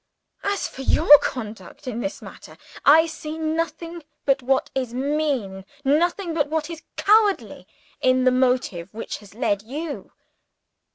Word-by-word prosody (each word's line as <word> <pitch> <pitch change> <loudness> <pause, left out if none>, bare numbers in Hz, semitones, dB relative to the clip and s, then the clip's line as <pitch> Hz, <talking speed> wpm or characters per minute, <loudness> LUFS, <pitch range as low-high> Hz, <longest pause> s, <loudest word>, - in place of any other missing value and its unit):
_ 400 - 0
As 400 - -2
for 270 - -10
your 295 +2 +7
conduct 220 +1 -6
in 235 -2 -3
this 290 +4 -4
matter, - - -12 0.3
I 315 +3 +7
see 315 -1 -6
nothing 330 +1 -3 0.2
but 275 -1 +2
what 265 +1 0
is 255 -3 -3
mean, 265 -8 -1 0.2
nothing 340 +5 +1
but 300 -3 +1
what 315 +1 -2
is 325 -1 -8
cowardly, 420 -1 +2 0.3
in 255 0 +3
the 255 - +5
motive 250 -9 0
which 225 - -5
has 205 -1 -16
led 205 -4 0
_you. 285 +8 -6
285 Hz, 150 wpm, -23 LUFS, 250-320 Hz, 0.3 s, your